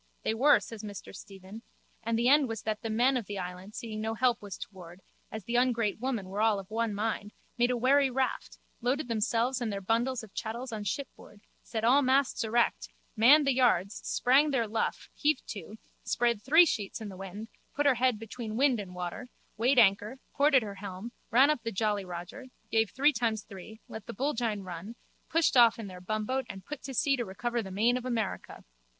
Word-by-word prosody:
They - - 0
were, 275 +6 +5
says 225 -3 -9
Mr 205 -2 -8
Stephen, 195 +3 -11 0.4
and 230 0 -1
the 235 +1 +2
end 285 +1 +5
was 225 -2 -5
that 215 -1 -2
the 225 - -4
men 245 +4 +3
of 230 -6 -5
the 205 - -5
island 180 +2 -7
seeing 220 -3 -5
no 220 +1 -2
help 240 0 +2
was 200 -3 -7
toward, 180 -2 -11 0.3
as 220 -2 -6
the 235 +5 -1
ungrate 235 -5 +1
women 240 -6 -2
were 200 +3 -3
all 220 -2 +3
of 195 +1 -9
one 225 -1 -1
mind, 210 0 -3 0.2
made 240 +1 +2
a 250 - 0
wherry 270 +3 +4
raft, 260 +1 -2 0.2
loaded 255 +4 0
themselves 235 +3 0
and 230 -3 -1
their 200 - -3
bundles 230 +5 0
of 215 - -13
chattels 235 +3 -5
on 215 -2 -5
shipboard, 205 -2 -6 0.2
set 225 -2 -5
all 255 +5 +5
masts 265 -1 +2
erect, 235 +2 +1 0.3
manned 275 +7 +6
the 275 - +3
yards, 220 -6 +2
sprang 275 +5 +3
their 265 -5 +1
luff, 220 +2 -2
heaved 295 -2 0
to, 210 0 -7 0.3
spread 235 -3 0
three 320 +9 +6
sheets 210 -10 -3
in 220 -2 -6
the 190 - -9
wind, 195 +3 -8 0.3
put 290 - 0
her 280 - +6
head 250 -1 +1
between 225 0 -6
wind 265 -3 +3
and 185 -3 -7
water, 180 +7 -5 0.3
weighed 245 +5 +2
anchor, 210 +2 +4 0.2
ported 280 -3 +4
her 200 -2 -6
helm, 200 +3 -7 0.2
ran 265 +5 +5
up 300 - -2
the 230 0 -4
jolly 210 -1 0
Roger, 180 +9 -8 0.2
gave 220 -2 +2
three 290 +3 +3
times 225 -3 -1
three, 210 +3 -11
let 220 -2 -9
the - - -7
bullgine 230 -5 -1
run, 185 +5 -8 0.3
pushed 330 -3 +2
off 235 -2 +6
in 225 - -6
their 185 -2 -9
bumboat 215 +7 -2
and 190 0 -9
put 300 - -7
to 270 - -7
sea 275 +2 +3
to 240 - -1
recover 235 +4 -3
the 195 - -8
main 225 +6 +2
of 250 - -6
America. 230 -5 -3
225 Hz, 205 wpm, -29 LUFS, 205-255 Hz, 0.4 s, manned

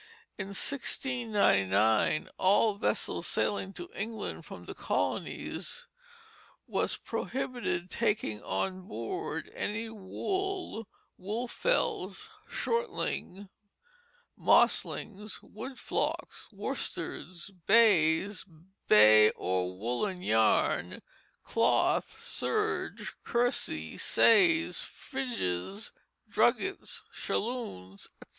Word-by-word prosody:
In 190 - -5
1699 200 - +2
all 205 +3 +4
vessels 200 - -1
sailing 195 -2 0
to 175 -2 -6
England 220 0 -4
from - - -9
the - - -6
colonies 485 - -2 0.8
were - - 0 0.2
prohibited 245 -9 -2
taking 205 - 0
on 185 -1 -2
board 375 - -4
any 225 +2 -3
"Wool, 360 - -3 0.3
Woolfells, 250 - -1 0.2
Shortlings, 460 - -2 0.9
Moslings, 210 0 +2
Wool 255 +5 -8
Flocks, - - -2
Worsteds, 185 +2 -4 0.2
Bays, 200 -3 +5 0.4
Bay 105 0 +8
or 90 0 -1
Woollen 180 - -2
Yarn, 110 - +2 0.4
Cloath, - - +2
Serge, 430 0 -2
Kersey, 235 - 0
Says, 325 +9 +4
Frizes, 210 - -3 0.4
Druggets, 465 - +1
Shalloons, 200 - -3
etc." - - -15
210 Hz, 75 wpm, -30 LUFS, 160-250 Hz, 0.9 s, Bay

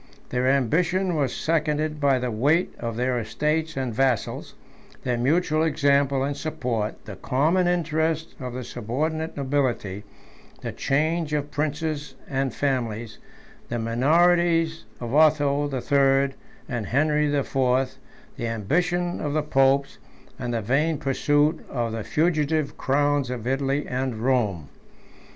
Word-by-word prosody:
Their 125 +1 0
ambition 175 - +2
was 140 -5 +1
seconded 155 -1 0
by 140 -2 +3
the 125 -1 -2
weight 145 +11 +2
of 115 -1 -4
their 125 0 0
estates 150 +8 -1
and 130 -3 -2
vassals, 130 -1 -1 0.5
their 125 -1 0
mutual 155 +5 +1
example 140 -3 +2
and 140 +1 -1
support, 120 -8 -3
the 105 - -7
common 160 +7 +1
interest 160 -2 0
of 125 -2 -5
the 130 0 -5
subordinate 155 +9 -3
nobility, 130 -8 -1 0.6
the - - -4
change 155 +3 0
of 145 -1 -1
princes 150 0 -2
and 135 -1 -1
families, 115 -5 -2 0.5
the 120 - -2
minorities 165 +6 +2
of 120 0 -5
Otho 145 -2 +4
the 135 -3 -3
Third 135 0 +3 0.3
and 120 -5 -3
Henry 150 +3 +2
the 145 -1 +1
Fourth, 130 0 0 0.4
the 115 - -2
ambition 175 - 0
of 145 -1 -2
the 155 0 +1
popes, 135 -1 +2 0.4
and 120 - -3
the 115 -2 -2
vain 145 +8 +1
pursuit 145 +3 +1
of 120 -3 -2
the 110 -1 -4
fugitive 155 -1 0
crowns 145 -1 +1
of 120 -3 -5
Italy 135 +2 0
and 130 -1 -2
Rome. 110 - 0
140 Hz, 135 wpm, -25 LUFS, 125-155 Hz, 0.6 s, Otho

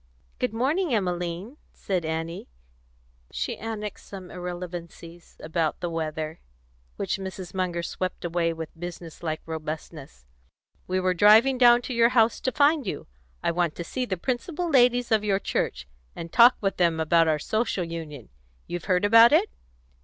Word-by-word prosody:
"Good - - 0
morning, 275 - 0
Emmeline," 180 - -3 0.2
said 185 -4 -2
Annie; 165 +2 -4 0.8
she - - -3
annexed 210 -2 -6
some 190 -3 -9
irrelevancies 175 -1 -8
about 160 0 -1
the 175 -1 -3
weather, 160 -1 -4 0.6
which - - -2
Mrs. 190 -1 -7
Munger 180 -2 -2
swept 185 +1 -4
away 170 0 0
with 160 -1 -6
business 175 -1 -8
like 155 -2 -3
robustness. 155 - -7 0.6
"We 185 +1 0
were 185 0 +1
driving 220 +8 +5
down 240 -1 +6
to 255 - -4
your 235 0 +4
house 235 -2 +3
to 260 - 0
find 290 -3 +3
you. 150 - -4 0.4
I - - +2
want 170 -2 0
to 170 - -5
see 255 +9 -3
the 190 -6 -3
principal 275 - -3
ladies 245 -4 +3
of 215 -1 +3
your 200 -2 +2
church, 65 - -2 0.3
and 170 0 -7
talk 240 +2 +7
with 195 -1 -1
them 170 -2 +2
about 165 +1 +3
our 155 -1 +2
Social 215 +3 -1
Union. 160 -6 -7 0.4
You've 175 -1 -6
heard 185 0 +2
about 230 +3 +7
it?" 345 +8 +3
180 Hz, 160 wpm, -26 LUFS, 165-230 Hz, 0.8 s, talk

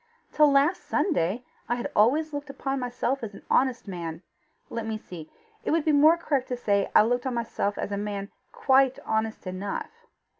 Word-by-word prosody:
Till 300 -1 +5
last 280 +6 +3
Sunday, 245 - 0 0.2
I 240 - +2
had 240 - -4
always 295 +9 +3
looked 290 0 -5
upon 275 0 -3
myself 250 +2 -2
as 215 -3 -6
an - - -13
honest 255 -4 +2
man: 170 -3 -6 0.5
let 230 -1 -4
me 220 -1 -2
see: 170 -7 -10 0.3
it - - -2
would 320 -1 +1
be 310 - +4
more 305 +3 +6
correct 280 -6 -1
to 250 - -3
say 200 -4 +1
I - - +8
looked 245 +3 0
on 255 - -2
myself 225 -3 -2
as - - -3
a 200 - -1
man 200 -1 -4 0.2
QUITE 265 -1 +3
HONEST 220 -1 -1
ENOUGH. 185 +2 -4
245 Hz, 190 wpm, -26 LUFS, 205-275 Hz, 0.5 s, I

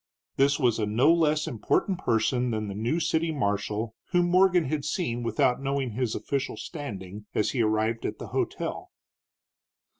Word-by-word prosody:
This 140 +1 +3
was 120 -5 +2
a 105 - 0
no 120 +10 +4
less 155 -2 +2
important 135 - 0
person 120 +2 +1
than 110 -2 -2
the - - -4
new 115 +11 -1
city 160 0 +1
marshal, 110 -3 -2
whom 175 -1 +1
Morgan 185 -1 +5
had 145 +1 -2
seen 150 -6 -2
without 120 +2 +1
knowing 135 -2 -1
his 120 0 -1
official 135 +5 -2
standing, 105 - -7
as 105 - +1
he 125 - 0
arrived 110 +1 +1
at - - -5
the - - -8
hotel. - - -3
125 Hz, 160 wpm, -27 LUFS, 110-155 Hz, -, Morgan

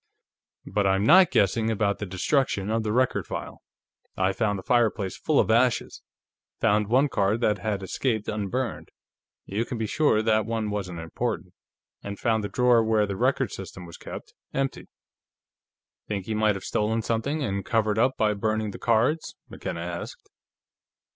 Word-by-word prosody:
But 100 -2 0
I 95 - +3
am 100 +2 0
not 185 +8 +7
guessing 110 +3 +2
about 100 -2 0
the 105 - -4
destruction 100 +1 0
of 115 0 +1
the 110 -1 -2
record 125 +3 +1
file; - - -6 0.6
I 95 +1 +2
found 105 -1 0
the 95 - -8
fireplace 110 -5 +1
full 155 - +1
of - - +3
ashes, 120 +2 +1 0.6
found 105 0 +2
one 130 +6 +4
card 105 -3 +1
that 105 -3 +2
had 105 -2 -2
escaped 110 +2 -1
unburned 110 +4 -3 0.6
you 105 +4 -1
can 120 - -5
be 110 - -1
sure 110 -3 +2
that 110 -1 +2
one 110 -2 -2
wasn't 95 -4 -4
important 90 +3 -4 0.5
and 100 0 -6
found 110 -2 +1
the 105 - -3
drawer 125 -3 +4
where 110 -1 +2
the 100 -1 -4
record - - +1
system 90 - -8
was 85 - -11
kept - - -9 0.2
empty." 135 0 -2 1.2
"Think 100 -3 -3
he 110 - -3
might 110 -1 +2
have 95 - -7
stolen 110 +1 0
something, 135 +8 -1
and 100 -4 -2
covered 110 0 +1
up 130 +3 +2
by 105 -1 +2
burning 110 +1 -1
the - - -9
cards?" 120 +7 +1
McKenna 85 - -5
asked. 85 0 -7
110 Hz, 170 wpm, -26 LUFS, 100-115 Hz, 1.2 s, not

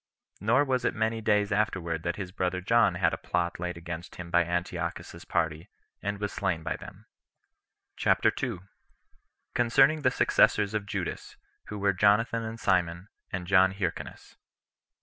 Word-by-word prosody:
Nor 120 +8 +3
was 130 -2 0
it - - 0
many 110 0 0
days 105 -2 +2
afterward 95 -6 0
that 85 +1 -2
his 95 -3 -6
brother 90 -1 -1
John 105 -1 +3
had 85 -2 +2
a - - -3
plot 85 -1 -2
laid 90 0 -4
against 85 0 -7
him 85 -1 -8
by 85 0 +4
Antiochus's 85 +1 -4
party, 80 -1 -1 0.3
and 100 0 -2
was 105 -1 -3
slain 80 -3 -1
by - - -2
them. - - -12 0.9
CHAPTER - - +3
2. 115 -9 -4 0.9
Concerning 135 +6 +4
The 130 - +4
Successors 105 -4 +3
Of 105 -2 -2
Judas, 95 -4 -5 0.3
Who 105 - -6
Were 100 -1 +2
Jonathan 105 +4 +3
And 115 0 -6
Simon, 90 -1 0 0.2
And 90 -2 -3
John 95 0 +4
Hyrcanus. 95 -4 -5
95 Hz, 155 wpm, -28 LUFS, 85-110 Hz, 0.9 s, by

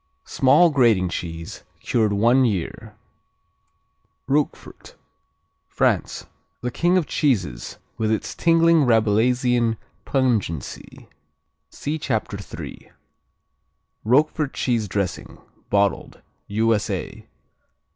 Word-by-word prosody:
Small 150 +6 +4
grating 115 -10 +3
cheese, 85 -1 -6 0.2
cured 110 -3 0
one 120 +6 +3
year. 105 0 -3 1.3
Roquefort 145 +2 -3 0.7
France - - 0 0.5
King 175 +2 +2
of 175 - +1
cheeses, 100 - -1 0.2
with 110 -1 0
its 110 - -2
"tingling 165 -3 +3
Rabelaisian 115 +1 +2 0.3
pungency." 115 - -2 0.6
See 155 +2 -4
Chapter 110 -7 -2
3. 100 - -9 1.1
Roquefort 145 +4 +1
cheese 115 -4 0
dressing, 100 -1 -4 0.3
bottled 100 -1 0 0.3
_U.S.A. 110 0 -1
115 Hz, 80 wpm, -22 LUFS, 100-135 Hz, 1.3 s, Small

